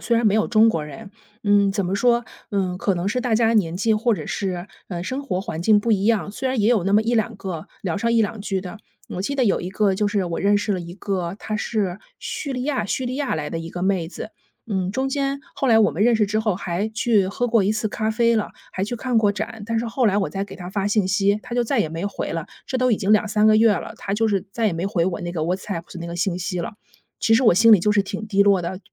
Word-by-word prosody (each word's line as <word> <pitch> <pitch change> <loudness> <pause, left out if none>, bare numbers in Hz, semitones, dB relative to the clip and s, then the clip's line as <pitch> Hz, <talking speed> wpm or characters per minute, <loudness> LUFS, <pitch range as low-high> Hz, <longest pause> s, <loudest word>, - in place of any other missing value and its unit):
虽 235 - +1
然 230 -1 +2
没 205 - +3
有 220 - +2
中 225 0 +5
国 165 - -2
人， 195 +7 -9 0.3
嗯， 205 -1 +4
怎 195 -1 -1
么 185 - -1
说， 235 +2 +2 0.3
嗯， 185 -3 -1
可 195 - +1
能 175 +2 -3
是 250 +5 0
大 240 -3 0
家 225 0 +3
年 175 -6 +1
纪 220 +3 +2
或 225 +1 +2
者 - - -6
是， 185 -2 -3 0.2
呃， 175 -2 -4
生 260 +9 -3
活 190 -9 -2
环 160 -4 -5
境 210 +3 +5
不 225 +2 +1
一 200 -1 +1
样， 220 -3 +1
虽 260 +4 -2
然 260 -2 -1
也 215 +3 +3
有 210 -7 +2
那 195 - +2
么 215 - +5
一 235 +2 0
两 220 -1 0
个 180 -5 -6 0.2
聊 190 +1 -2
上 230 +2 0
一 225 - +4
两 210 0 -3
句 195 -2 -2
的。 195 +3 -8 0.3
我 180 - -4
记 280 +9 -2
得 265 - +2
有 200 - +2
一 180 - -4
个 195 0 +1
就 205 +2 +1
是 200 -3 0
我 170 -1 -3
认 205 +1 +3
识 205 0 0
了 185 - -2
一 170 +1 -8
个 190 -2 -3
她 215 - -4
是 210 -4 -1 0.2
叙 280 -3 -4
利 250 - -3
亚 275 -6 -1
叙 260 - -2
利 255 +2 -3
亚 285 - -1
来 150 -2 -4
的 165 - -3
一 165 0 -6
个 175 +1 -6
妹 185 -4 0
子。 215 - -8 0.4
嗯， 190 0 -1
中 265 +2 -1
间 275 0 -1 0.2
后 270 - 0
来 225 -2 +5
我 205 - +4
们 185 +9 0
认 240 -1 +4
识 215 -2 +2
之 215 +2 0
后， 215 -3 +1
还 185 +2 -2
去 220 -3 +2
喝 245 +5 -1
过 225 -4 +3
一 210 - +2
次 215 0 -1
咖 215 +1 -2
啡 230 +1 +2
了， 215 - -1 0.2
还 190 - -2
去 230 - -4
看 240 -1 0
过 205 -2 +3
展。 215 +1 -5
但 230 0 -1
是 235 - -3
后 240 +1 +1
来 200 -1 +2
我 200 - 0
再 195 0 -3
给 200 - -11
她 190 +2 -3
信 205 -2 +1
息， 200 +1 +2
她 245 -1 -6
就 240 - +2
再 245 -1 +1
也 160 - 0
没 165 +5 -4
回 200 - -4
了， 165 -1 -3 0.2
这 260 - -1
都 255 -2 +3
已 - - +3
经 200 +1 -1
2-3 210 0 +3
个 215 - +6
月 220 -1 +5
了， 185 - -4
她 195 - -3
就 225 +1 +1
是 200 -1 -1
再 225 0 0
也 - - -2
没 170 +3 -2
回 175 -4 +1
我 180 -2 -2
那 175 - -4
个 165 - -3
WhatsApp 175 +1 -3
的 - - -8
那 170 - -6
个 170 - -6
信 175 0 -1
息 180 0 -3
了。 205 +5 -5 0.4
其 225 - +3
实 255 - +4
我 220 - +6
心 225 +5 +6
里 195 - +7
就 210 - +2
是 205 - +4
挺 200 +2 -4
低 200 -1 +3
落 195 -3 +4
的， 180 +2 -4
205 Hz, 325 characters per minute, -22 LUFS, 185-225 Hz, 0.4 s, 里